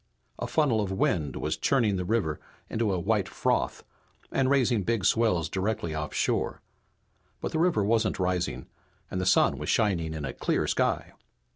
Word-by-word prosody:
A - - -2
funnel 135 -9 +2
of 100 -2 -2
wind 80 -7 0
was - - -2
churning 115 -7 +2
the 90 - -1
river 90 -6 0 0.3
into 110 -2 0
a 95 - 0
white 100 +1 0
froth - - -1 0.5
and 130 -1 +2
raising 125 -5 +3
big 110 -1 -1
swells 100 -8 +2
directly 95 -1 -2
offshore. 75 -1 -1 0.8
But - - -4
the 160 - -1
river 165 - +3
wasn't 110 +1 +1
rising 90 -1 -1 0.5
and 95 - -2
the 95 - -1
sun 90 - +4
was - - -4
shining 85 -8 +1
in 75 -2 -4
a 65 - -4
clear - - 0
sky. - - 0
100 Hz, 165 wpm, -28 LUFS, 90-115 Hz, 0.8 s, sun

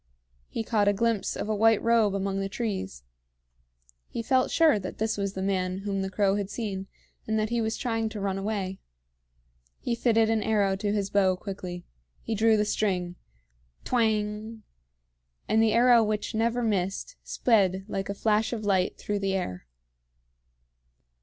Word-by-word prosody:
He 225 - -3
caught 210 -2 +1
a 205 - +5
glimpse 225 0 0
of - - -3
a 215 - 0
white 225 0 +4
robe 230 -4 +3
among 195 0 -1
the 195 0 -2
trees. 195 - -4 1.0
He 230 - -5
felt 255 +2 +2
sure 315 -9 +4
that 185 -1 -7
this 220 0 0
was 200 -1 -2
the 190 - -4
man 185 -1 -1
whom 195 -1 -1
the 190 - -2
crow 195 +1 +1
had 200 -1 -3
seen, 200 -4 -4 0.4
and 220 0 0
that 215 +1 -1
he 235 -1 +1
was 220 0 -1
trying 225 -3 -1
to 215 -1 -6
run 195 -1 -1
away. 195 -2 -3 1.0
He 240 - -2
fitted 225 -1 +3
an 220 -1 +1
arrow 205 -3 +2
to 205 +1 -2
his 200 -2 -1
bow 190 -2 +3
quickly. 180 -2 -7 0.4
He 225 - -3
drew 220 +1 +4
the 210 - +2
string. 180 -4 -1 0.7
Twang! 220 -1 -1 0.8
And 220 +1 +3
the 225 -1 +3
arrow 240 0 +6
which 210 -1 -2
never 230 +2 0
missed 200 - -1
sped 195 -5 +2
like 195 -2 -3
a 200 - -2
flash 220 +1 +1
of 215 -3 -4
light 190 -2 +1
through 205 -1 -2
the 195 -1 0
air. 90 - -4
210 Hz, 170 wpm, -27 LUFS, 195-225 Hz, 1.0 s, arrow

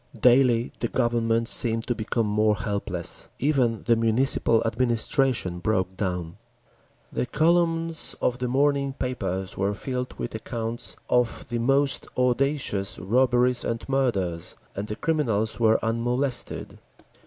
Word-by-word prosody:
Daily 125 0 +4
the 120 - 0
Government 115 -1 +1
seemed 115 -2 +1
to 120 - 0
become 115 0 -1
more 105 0 +2
helpless. 100 -6 -2
Even 130 -6 +1
the 115 - +3
Municipal 115 0 +2
administration 115 -4 +1
broke 95 -1 0
down. 90 -3 -3 0.7
The 125 - -2
columns 165 +2 +1
of 125 0 0
the 125 - -1
morning 140 +1 +1
papers 95 -9 -3
were 100 +1 0
filled 125 +3 -4
with - - -4
accounts 115 +1 -4
of 125 -1 +1
the 120 - -2
most 135 +3 +2
audacious 125 -5 0
robberies 125 +3 +2
and 115 0 -3
murders, 100 -12 -1 0.2
and 100 +2 -4
the 105 - -4
criminals 115 -9 0
were 110 -1 +4
unmolested. 120 +3 -2
120 Hz, 125 wpm, -25 LUFS, 110-130 Hz, 0.7 s, Daily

